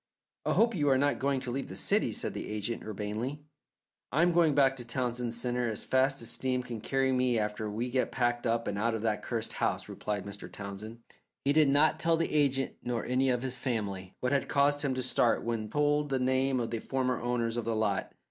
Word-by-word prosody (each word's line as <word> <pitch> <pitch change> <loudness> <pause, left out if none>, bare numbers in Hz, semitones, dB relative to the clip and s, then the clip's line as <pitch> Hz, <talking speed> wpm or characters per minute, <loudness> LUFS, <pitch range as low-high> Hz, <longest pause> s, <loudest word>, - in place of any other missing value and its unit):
"I - - +3
hope 230 +1 +4
you 145 -5 +1
are 135 - +5
not 145 +2 +1
going 140 0 +1
to 125 - -4
leave 135 +2 -3
the - - -8
city?" - - +2
said - - -2
the - - -5
agent, 105 +2 -3
urbanely. 110 +7 -4 0.7
"I 155 +6 +3
am 175 - +4
going 165 -4 +4
back 135 -2 +4
to 120 - -5
Townsend 120 0 -2
Centre 120 0 -1
as 110 - -4
fast 135 0 +2
as 115 - -3
steam 130 0 -1
can 120 -3 -6
carry 135 -1 +1
me 125 -2 +2
after 105 0 -2
we 115 +4 -3
get 130 0 +1
packed 120 -1 0
up 115 0 0
and 100 - -2
out 115 +1 +1
of 110 - -4
that 110 -2 0
cursed 115 -2 -3
house," - - -1
replied 105 -2 -4
Mr. 100 0 -8
David - - -10
Townsend. 105 +3 -7 0.5
He 140 - +4
did 155 -2 +5
not 145 +3 +4
tell 165 0 +3
the 165 - -1
agent 135 -3 +1
nor 120 -2 -2
any 130 +1 +2
of 125 -1 0
his 130 -1 -1
family 100 -7 -3
what 125 - 0
had 140 -1 +1
caused 145 +1 +3
him 140 -3 0
to 130 - -2
start 120 -2 +2
when 115 -2 -2
told 150 +1 +1
the 135 - +1
name 130 +1 +1
of 115 -2 -2
the 115 - -2
former 130 0 -1
owners 120 -1 0
of 120 - -2
the 115 -1 0
lot. 105 -3 0
125 Hz, 235 wpm, -30 LUFS, 115-135 Hz, 0.7 s, are